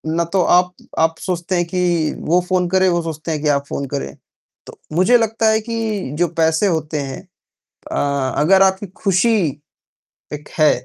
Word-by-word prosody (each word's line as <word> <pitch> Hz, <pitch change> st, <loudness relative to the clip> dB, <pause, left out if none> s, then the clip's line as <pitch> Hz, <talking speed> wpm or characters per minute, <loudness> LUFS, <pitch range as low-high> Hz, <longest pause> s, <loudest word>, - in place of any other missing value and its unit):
ना 170 Hz, -, +2 dB
तो 190 Hz, -, +3 dB
आप 180 Hz, 0 st, +3 dB, 0.3 s
आप 160 Hz, 0 st, +2 dB
सोचते 180 Hz, 0 st, -3 dB
हैं 175 Hz, -1 st, +1 dB
कि 175 Hz, -3 st, 0 dB
वो 175 Hz, +3 st, +2 dB
फ़ोन 180 Hz, -1 st, +1 dB
करे, 190 Hz, +1 st, +3 dB
वो 175 Hz, -1 st, +1 dB
सोचते 160 Hz, 0 st, -5 dB
हैं 150 Hz, -, -2 dB
कि 155 Hz, -, -1 dB
आप 140 Hz, -1 st, +1 dB
फ़ोन 140 Hz, -, -4 dB
करें। 105 Hz, -, -4 dB, 0.5 s
तो -, -, -13 dB, 0.2 s
मुझे 225 Hz, +8 st, +5 dB
लगता 225 Hz, -1 st, +1 dB
है 220 Hz, 0 st, +3 dB
कि 230 Hz, +1 st, -5 dB, 0.4 s
जो 175 Hz, -, +3 dB
पैसे 160 Hz, +5 st, +3 dB
होते 155 Hz, -3 st, -1 dB
हैं 135 Hz, -1 st, -6 dB, 0.7 s
अ, -, -, -2 dB, 0.4 s
अगर 190 Hz, +6 st, +5 dB
आपकी 190 Hz, +1 st, +2 dB, 0.2 s
खुशी 200 Hz, +4 st, +3 dB, 1.0 s
एक 150 Hz, 0 st, -8 dB
है 155 Hz, -, +6 dB
175 Hz, 175 wpm, -19 LUFS, 160-190 Hz, 1.0 s, है